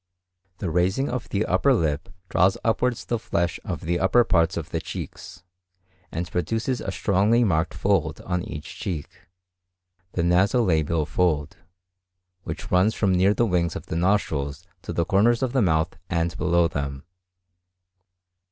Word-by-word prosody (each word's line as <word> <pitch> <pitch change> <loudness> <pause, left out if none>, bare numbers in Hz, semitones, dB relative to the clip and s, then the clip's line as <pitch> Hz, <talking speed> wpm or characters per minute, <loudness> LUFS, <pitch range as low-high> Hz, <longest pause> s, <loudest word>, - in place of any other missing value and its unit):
The 90 -3 -3
raising 95 - +1
of 125 -1 -4
the 105 +2 0
upper 125 +9 +3
lip 75 -7 -1 0.2
draws 90 +2 +3
upwards 120 +1 0
the 120 - -1
flesh 85 -5 -1
of - - -4
the 85 +1 -1
upper 110 +6 +4
parts 85 -7 +2
of - - -5
the - - -2
cheeks, 90 - -8 0.7
and 85 +2 -4
produces 115 - -1
a 95 - -3
strongly 105 +5 +2
marked 80 -7 +1
fold - - 0
on 90 -1 -2
each 75 -3 -8
cheek,—the 90 +1 -8
naso 95 +8 +3
labial 80 -4 +1
fold,—which 90 +3 -5
runs 95 +5 +3
from 100 -3 +2
near 95 +3 +3
the 120 - +2
wings 90 -5 0
of - - -6
the - - -4
nostrils 85 -5 0 0.2
to - - -6
the 85 - 0
corners 110 +6 +3
of 130 -1 -1
the 130 - +3
mouth 80 -4 +1
and 85 -1 0
below 85 -2 +2
them. 70 -3 -4
90 Hz, 150 wpm, -24 LUFS, 85-100 Hz, 0.7 s, upper